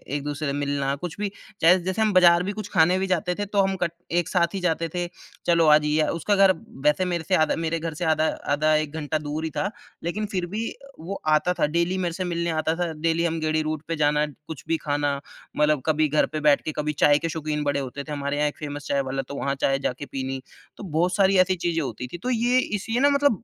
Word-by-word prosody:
एक 145 - -3
दूसरे 145 +1 -3
से 140 - -1
मिलना। 140 -1 -1
कुछ 170 +2 -6
भी 205 -1 -2 0.3
जैस 175 +3 +6
जैसे 190 +4 -1
हम 215 - +3
बाज़ार 175 -1 +6
भी 195 - -2
कुछ 215 +1 -6
खाने 175 +2 +4
भी 190 - -1
जाते 180 -1 0
थे 205 +2 -3
तो 200 0 +1
हम 195 0 +1
कट 170 - +1 0.2
एक 175 - +2
साथ 170 -1 +1
ही 195 - -1
जाते 165 -2 0
थे। 175 0 -1 0.4
चलो 170 -1 +4
आज 150 0 +6
ये 155 +1 +2
उसका 185 +5 0
घर 195 -1 +6 0.3
वैसे 150 +5 +3
मेरे 175 -2 -2
से 190 - +3
आधा 155 -2 +2
मेरे 165 0 -1
घर 165 0 -4
से 165 +3 -4
आधा 160 0 +2 0.3
आधा 155 +1 +2
1 155 -1 0
घंटा 155 -1 -2
दूर 150 +1 -4
ही 160 - -1
था। 200 - 0 0.3
लेकिन 205 +6 -2
फिर 180 -2 0
भी 215 +5 -3 0.3
वो 190 +5 -6
आता 155 +4 +3
था। - - +4
डेली 170 +4 0
मेरे 175 -2 -1
से 185 +2 -3
मिलने 170 -1 -1
आता 160 0 0
था, 175 -1 -1
डेली 165 +2 0
हम 165 -1 -1
गेड़ी 155 0 0
रूट 155 -1 -3
पे 165 - -1
जाना, 150 0 +2
कुछ 150 +1 -10
भी 165 - +1
खाना। 145 -1 0 0.4
मतलब 150 -2 +3
कभी 155 0 +2
घर 150 +1 +2
पे 155 - -3
बैठ 150 -1 +4
के 155 - -4
कभी 150 0 -1
चाय 145 0 +6
के - - 0
शौकीन 155 -2 -2
बड़े 145 -1 0
होते 140 +1 -5
थे, 150 - -9
हमारे 145 0 -2
यहाँ 150 - +2
एक - - -12
फ़ेमस 145 -1 -6
चाय 140 -1 +1
वाला 135 0 -2
तो 140 - -7
वहाँ 140 0 -1
चाय 135 0 +1
जाके 135 +1 -3
पीनी। 135 0 -4 0.4
तो - - -9
बहुत 175 0 0
सारी 195 -1 +4
ऐसी 185 0 +4
चीज़ें 170 -2 -1
होती 125 -1 -5
थीं 175 - -7
तो 250 - -1
ये 245 +1 +2 0.2
इस 200 - -4
ये 230 +2 +1
न 285 +2 +5
मतलब, 280 -7 +2
160 Hz, 260 wpm, -24 LUFS, 150-180 Hz, 0.4 s, जैस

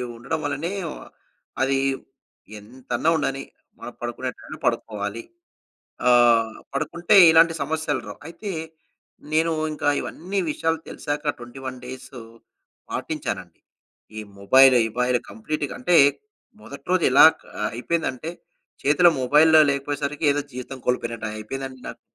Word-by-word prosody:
ఉండడం 135 +8 -4
వల్లనే 145 +4 -3 0.9
అది 135 +1 +2 0.8
ఎంతన్నా 125 +6 -3
ఉండని, 135 -2 -2 0.4
మనం - - -8
పడుకునే - - -4
టైమ్‌కి - - -10
పడుకోవాలి. - - -2 0.8
ఆహ్, 120 -2 +4 0.2
పడుకుంటే 170 +8 0 0.2
ఇలాంటి 165 0 +5
సమస్యలు 150 -1 -2
రావు. 105 - -9
అయితే 170 +5 -8 0.8
నేను 160 +1 +2 0.2
ఇంకా 145 - 0
ఇవన్నీ 190 +5 -4
విషయాలు 165 +1 -1
తెలిసాక 145 0 -4
21 130 +1 -9 0.8
పాటించానండి. 95 - -5 0.6
ఈ - - -3 0.2
మొబైల్ 130 +6 +6
ఇబైల్ 125 +2 0
కంప్లీట్‌గ 140 +8 -4
అంటే 170 +7 +3 0.6
మొదటి - - -11
రోజు 185 -2 +2
ఎలా 130 - +8 0.4
అ - - -3
అయిపోయిందంటే 140 +3 -2 0.5
చేతిలో 160 +5 +5
మొబైల్లో 155 +5 +5
లేకపోయేసరికి 145 +2 -2
ఏదో 145 +1 0
జీవితం 125 +1 -7
కోల్పోయినట్టు 115 -3 -2
అయిపోయిందండి 130 +4 -7
నాకు. - - -9
135 Hz, 110 wpm, -23 LUFS, 125-160 Hz, 0.9 s, ఎలా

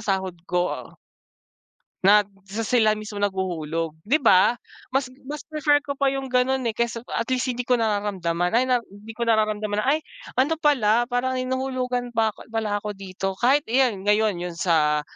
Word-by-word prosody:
sahod 190 -4 -1
ko. 180 0 -1 1.2
Nag 205 0 +6 0.2
sa 205 +4 -5
sila 220 -2 +3
mismo 210 -1 -7
naghuhulog 170 -5 -2 0.2
di 290 +7 +3
ba? 190 +1 +5 0.4
Mas 265 -1 +1 0.2
mas 295 +2 -5
prefer 295 -2 +2
ko 280 -1 -5
pa 280 - +2
yung 270 -1 -4
gano'n, 255 +1 +2
eh, 215 - -10
kaysa 235 -1 -1
at 230 - -1
least 255 +1 -1
hindi 250 0 -4
ko 250 - +3
nararamdaman, 200 -6 0
ay 240 - +5
na 250 -1 +4
hindi 205 +3 -13
ko 235 - -2
nararamdaman, 215 -2 +1
ay! 280 +4 +2 0.4
Ano 280 +5 +3
pala 240 -6 +3
parang 255 +1 0
hinuhulugan 255 -1 -2
pa 220 -1 +2 0.2
pala 215 -2 -1
ako 210 0 -5
dito 195 0 -4
kahit 275 +4 +4
iyan 230 -5 +1
ngayon 210 -2 +2
'yon 175 0 -5
sa 155 -3 +2
220 Hz, 165 wpm, -24 LUFS, 195-255 Hz, 1.2 s, Nag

